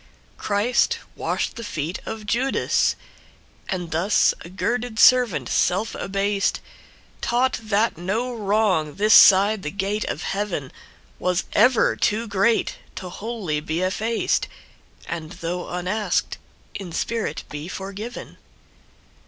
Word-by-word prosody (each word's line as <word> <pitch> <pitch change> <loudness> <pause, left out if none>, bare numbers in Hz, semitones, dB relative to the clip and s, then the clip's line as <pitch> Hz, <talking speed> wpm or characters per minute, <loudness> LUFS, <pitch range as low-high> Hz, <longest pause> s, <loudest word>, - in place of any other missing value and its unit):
Christ 215 +4 +1 0.2
washed - - -2
the 230 - -6
feet 165 -3 -4
of 220 -1 -5
Judas! 245 +6 +1 0.7
And 180 -3 -3
thus 180 +6 +3
a 170 - -10
girded 230 +5 -2
servant, 225 - +5
self 195 +5 +1
abased, 195 +1 -1 0.6
Taught 250 +2 +1
that 215 -4 0
no 225 +8 -2
wrong 200 -8 +1
this 210 +2 +3
side 200 +2 +7
the 150 - -3
gate 200 +4 -2
of 155 - -4
heavenWas 180 - -4
ever 250 -3 +4
too 225 +2 0
great 205 +3 +1 0.2
to 185 - -6
wholly 200 -6 -3
be 160 +3 -3
effaced, 220 +5 0 0.6
And 165 -1 -5
though 175 0 -4
unasked, 185 +4 -1 0.3
in 190 -4 -7
spirit 230 +6 -2
be 150 +2 -6
forgiven. 200 +6 -7
200 Hz, 115 wpm, -23 LUFS, 180-220 Hz, 0.7 s, side